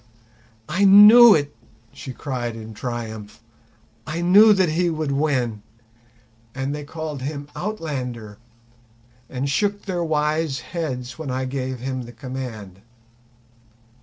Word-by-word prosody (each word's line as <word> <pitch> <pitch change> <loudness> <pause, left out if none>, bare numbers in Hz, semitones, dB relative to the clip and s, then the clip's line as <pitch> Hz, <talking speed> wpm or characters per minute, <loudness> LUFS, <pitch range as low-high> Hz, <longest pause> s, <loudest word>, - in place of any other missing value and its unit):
"I 180 +6 0
knew 210 +4 +9
it," 145 -1 -2 0.4
she 130 - -8
cried 125 -3 -5
in 110 -1 -9
triumph. 110 -2 -7 0.7
"I 160 +2 -3
knew 200 +5 +6
that 190 -4 +3
he 170 +3 0
would 155 -3 -3
win; 130 -7 -1 0.9
and 135 +1 -3
they 150 0 -6
called 155 -2 -6
him 140 +1 -5
Outlander, 130 - -5 0.9
and 130 +1 -3
shook 205 +8 -1
their 180 -3 -3
wise 150 -3 -1
heads 130 -7 -5
when 155 -4 -5
I 130 +1 -2
gave 130 -1 -4
him 130 0 -4
the 120 - -12
command! 115 -6 -8
140 Hz, 125 wpm, -22 LUFS, 125-165 Hz, 0.9 s, knew